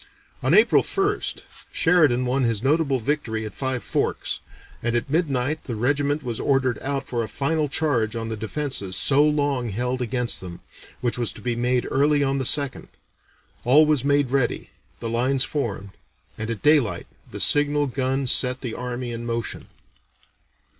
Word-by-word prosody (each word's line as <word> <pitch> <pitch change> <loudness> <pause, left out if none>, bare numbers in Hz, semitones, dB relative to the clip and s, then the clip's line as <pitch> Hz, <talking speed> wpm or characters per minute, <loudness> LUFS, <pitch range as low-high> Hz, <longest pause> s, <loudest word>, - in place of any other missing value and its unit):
On 130 +7 +3
April 220 +3 +6
1st, 405 +2 -1 0.3
Sheridan 150 -8 +3
won 130 +2 +1
his 115 -2 0
notable 140 -1 +2
victory 110 -4 -2
at 105 - -7
Five 130 -2 -2
Forks, - - -2 0.4
and 120 0 -1
at 120 +3 -1
midnight 150 -2 0
the 120 - -4
regiment 145 +5 0
was 120 -3 -4
ordered 130 -3 +1
out 140 0 -3
for 120 -2 -2
a 110 - -3
final 150 +3 -1
charge 125 -8 0
on 115 -1 -3
the 110 - -3
defences 110 -3 -3
so 145 +1 +4
long 145 -5 +1
held 125 +5 -2
against 125 0 -1
them, 90 -2 -8 0.4
which 120 0 -1
was 120 - 0
to - - -12
be 120 +2 -1
made 125 +1 0
early 145 +1 +3
on 135 0 0
the 130 - -1
2nd. 140 +1 0 0.8
All 145 +6 +6
was 150 -4 +1
made 140 -2 +2
ready, 135 -3 -1 0.3
the 115 - -4
lines 130 +4 +1
formed, 110 -9 -3 0.4
and 110 0 -5
at 115 -3 -4
daylight 135 - +3 0.2
the - - -7
signal 145 0 +4
gun 135 0 -1
set 125 +1 +3
the 120 -4 -4
army 125 0 -4
in 115 0 -5
motion. 115 -1 -4
130 Hz, 165 wpm, -23 LUFS, 120-145 Hz, 0.8 s, April